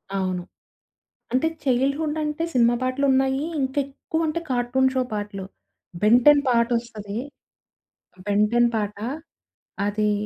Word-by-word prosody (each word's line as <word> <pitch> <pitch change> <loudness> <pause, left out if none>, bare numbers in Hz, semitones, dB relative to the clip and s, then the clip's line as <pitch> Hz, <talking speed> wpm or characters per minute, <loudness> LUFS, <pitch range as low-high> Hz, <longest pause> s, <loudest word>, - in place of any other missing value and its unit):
అవును. 185 -2 -1 0.9
అంటే 260 +5 +2 0.2
చైల్డ్‌హుడ్ 280 +4 +1
అంటే 300 +2 -2
సినిమా 240 -1 +4
పాటలు 255 +2 0
ఉన్నాయి. 265 +1 +2 0.2
ఇంక 265 0 -2
ఎక్కువ 320 +4 -3
అంటే 315 +2 -2
కార్టూన్ 250 +2 +2
షో 260 - +2
పాటలు. 205 -2 -4 0.6
బెంటెన్ 250 +7 +6
పాటోస్తది. 235 -3 0 1.1
బెంటెన్ 210 +4 +3
పాట. 210 -1 -2 0.9
అదీ, 210 0 +1
245 Hz, 105 wpm, -24 LUFS, 210-270 Hz, 1.1 s, బెంటెన్